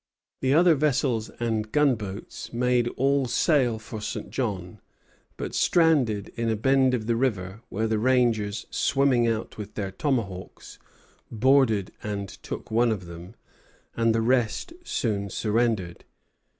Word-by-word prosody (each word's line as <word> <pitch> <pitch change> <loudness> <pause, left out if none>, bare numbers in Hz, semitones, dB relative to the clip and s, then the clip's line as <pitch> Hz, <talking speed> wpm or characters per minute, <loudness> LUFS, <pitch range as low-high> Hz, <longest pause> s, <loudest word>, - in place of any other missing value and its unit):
The 130 +2 +2
other 170 +1 +6
vessels 135 -6 0
and 110 -2 -1
gunboats 115 -10 -1
made 125 0 +1
all 135 0 +2
sail 125 -1 +2
for 110 0 -8
St. 105 - -5
John, 105 -6 -3 0.6
but - - -5
stranded 135 - +2
in 115 -1 -3
a 110 - +1
bend 130 +3 +3
of 110 -3 -4
the 115 +1 +1
river, 105 -5 -2
where 110 +3 -1
the 110 -1 0
rangers, 115 -4 +1
swimming 135 -4 +2
out 110 -1 -3
with 105 0 -8
their 100 -2 -3
tomahawks, 100 -7 -4 0.5
boarded 115 -4 +3
and 100 -1 -4
took - - -8
one 115 +1 +3
of 95 -5 -3
them, 85 +5 -10 0.6
and 115 -1 +2
the 115 - +2
rest 120 - 0
soon 100 - -2
surrendered. 105 -4 -1
115 Hz, 135 wpm, -26 LUFS, 105-130 Hz, 0.6 s, other